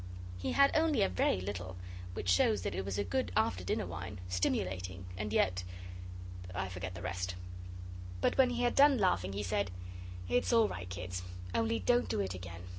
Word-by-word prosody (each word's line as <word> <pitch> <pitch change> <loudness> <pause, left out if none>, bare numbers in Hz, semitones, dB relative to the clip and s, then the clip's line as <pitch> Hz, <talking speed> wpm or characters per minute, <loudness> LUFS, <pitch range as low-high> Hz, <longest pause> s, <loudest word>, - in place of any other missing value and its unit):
He 90 - -1
had 275 0 +5
only 315 -2 +4
a - - +3
very 90 0 +2
little, 95 -1 -4 0.4
which - - -4
shows 95 +2 +4
that - - -1
it 95 - -1
was 100 0 -3
a 100 - +2
good 95 0 0
after 90 0 +2
dinner - - 0
wine, 90 +4 -6
stimulating, 90 0 -1
and 105 +2 -3
yet 90 -3 +2 0.9
...I 95 0 -1
forget 90 0 -5
the 85 - -7
rest. 90 0 -2 0.8
But - - +2
when 265 -2 +6
he 245 0 0
had 240 - +3
done 280 -1 +7
laughing 100 - +2
he 100 +1 -2
said, 95 0 0 0.6
'It's 245 - +2
all 230 -2 +6
right, 90 - -5
kids. 90 0 -4 0.3
Only 115 0 +2
don't 245 - +3
do - - 0
it 95 -2 0
again. 90 -2 -7
95 Hz, 190 wpm, -34 LUFS, 90-110 Hz, 0.9 s, done